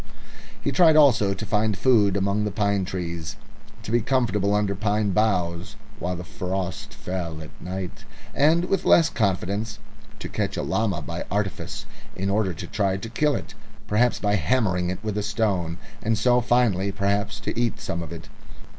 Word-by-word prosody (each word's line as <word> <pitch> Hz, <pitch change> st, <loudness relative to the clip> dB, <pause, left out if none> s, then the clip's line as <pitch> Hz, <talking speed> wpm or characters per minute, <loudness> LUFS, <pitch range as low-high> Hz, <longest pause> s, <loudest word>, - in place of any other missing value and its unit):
He -, -, -1 dB
tried 165 Hz, -4 st, +6 dB
also 115 Hz, -10 st, +5 dB
to 105 Hz, -, -5 dB
find 105 Hz, -1 st, +1 dB
food 105 Hz, -6 st, +4 dB
among 100 Hz, +2 st, +1 dB
the 105 Hz, -, 0 dB
pine 100 Hz, -1 st, 0 dB
trees, 85 Hz, -4 st, -4 dB, 0.5 s
to 110 Hz, -, -5 dB
be 120 Hz, 0 st, +3 dB
comfortable 105 Hz, -5 st, +1 dB
under 105 Hz, -1 st, +1 dB
pine 105 Hz, +1 st, 0 dB
boughs 90 Hz, -4 st, 0 dB, 0.2 s
while 90 Hz, +1 st, -2 dB
the 90 Hz, -, -6 dB
frost 95 Hz, -2 st, -4 dB
fell 90 Hz, -6 st, -5 dB
at 80 Hz, -1 st, -9 dB
night, 95 Hz, 0 st, -5 dB, 0.3 s
and 160 Hz, +5 st, +4 dB
with 195 Hz, 0 st, 0 dB
less 165 Hz, -, +5 dB
confidence 100 Hz, +1 st, -1 dB, 0.4 s
to -, -, -6 dB
catch -, -, -2 dB
a -, -, -1 dB
llama 100 Hz, -8 st, 0 dB
by -, -, -5 dB
artifice 100 Hz, 0 st, -3 dB, 0.3 s
in 100 Hz, +1 st, -1 dB
order 100 Hz, -2 st, +1 dB
to 80 Hz, -, -6 dB
try 100 Hz, -3 st, 0 dB
to 115 Hz, +4 st, -6 dB
kill 150 Hz, +5 st, +1 dB
it -, -, -6 dB, 0.3 s
perhaps 120 Hz, +4 st, +2 dB
by 105 Hz, 0 st, +2 dB
hammering 90 Hz, -, +1 dB
it 95 Hz, +3 st, -4 dB
with 105 Hz, -1 st, -1 dB
a -, -, 0 dB
stone 100 Hz, -5 st, -1 dB, 0.2 s
and 110 Hz, 0 st, +1 dB
so 125 Hz, +2 st, +3 dB
finally, 115 Hz, -6 st, +2 dB
perhaps, 100 Hz, +1 st, -1 dB
to -, -, -3 dB
eat 120 Hz, -1 st, 0 dB
some 85 Hz, -, -3 dB
of 80 Hz, -, -7 dB
it. -, -, -8 dB
100 Hz, 175 wpm, -24 LUFS, 95-110 Hz, 0.5 s, tried